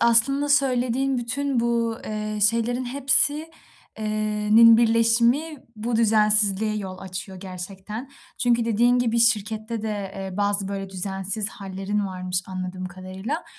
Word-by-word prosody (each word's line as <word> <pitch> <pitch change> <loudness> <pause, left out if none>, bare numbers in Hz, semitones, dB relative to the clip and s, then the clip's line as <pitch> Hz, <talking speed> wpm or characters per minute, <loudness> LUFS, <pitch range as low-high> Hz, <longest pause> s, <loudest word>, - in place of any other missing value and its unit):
aslında 265 +5 +4
söylediğin 265 -1 +1
bütün 250 +2 -1
bu, 230 -1 0
eee, 215 0 -4
şeylerin 230 +4 +1
hepsi 280 +4 +3 0.5
eee, 215 - -4 0.5
nin 230 0 +8
birleşimi 235 +6 +2 0.2
bu 225 +2 -2
düzensizliğe 215 -1 +3
yol 190 -2 -6
açıyor 190 0 -7
gerçekten. 195 +6 -8 0.3
Çünkü 235 -2 +2
dediğin 240 +2 +2
gibi 235 -1 +1
şirkette 220 0 0
de, 205 -3 -4
eee, 190 -1 -6
bazı 205 -1 0
böyle 195 -1 -5
düzensiz 195 +3 -2
hâllerin 195 0 -4
varmış, 185 -1 -3
anladığım 185 0 -6
kadarıyla 185 - -6
220 Hz, 125 wpm, -23 LUFS, 195-240 Hz, 0.5 s, nin